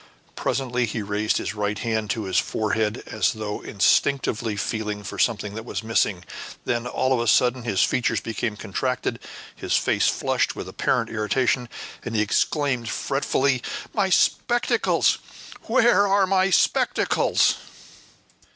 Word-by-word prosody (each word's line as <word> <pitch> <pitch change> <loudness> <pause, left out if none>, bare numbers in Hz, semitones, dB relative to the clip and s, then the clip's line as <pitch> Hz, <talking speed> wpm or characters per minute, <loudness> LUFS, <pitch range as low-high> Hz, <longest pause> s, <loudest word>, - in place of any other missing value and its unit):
Presently 125 -1 -1
he 110 0 -3
raised 105 +2 0
his - - -3
right 105 0 -2
hand 110 -3 -2
to 110 +1 -1
his 95 0 +1
forehead 110 +1 -1
as 105 - 0
though 105 -1 -5
instinctively 115 +1 +1
feeling 105 -1 -3
for 100 - -7
something 105 -2 0
that 110 +1 -6
was 115 - -5
missing; 110 -5 0 0.4
then, 120 0 -1
all 130 +1 0
of 125 - +1
a 120 - -1
sudden, 125 +3 +3
his 105 -5 +1
features 125 - +1
became 110 -1 -3
contracted, 125 +5 -2 0.4
his - - -1
face - - +2
flushed - - 0
with - - -6
apparent - - -1
irritation, 120 +3 0 0.3
and 120 -1 -5
he 105 - +3
exclaimed 125 +2 0
fretfully, 135 -1 0 0.3
"My 200 -3 +1
spectacles! 240 +5 +2 0.5
where 235 -4 +4
are 195 0 +3
my 190 0 +2
spectacles?" - - +2
115 Hz, 140 wpm, -24 LUFS, 105-130 Hz, 0.5 s, where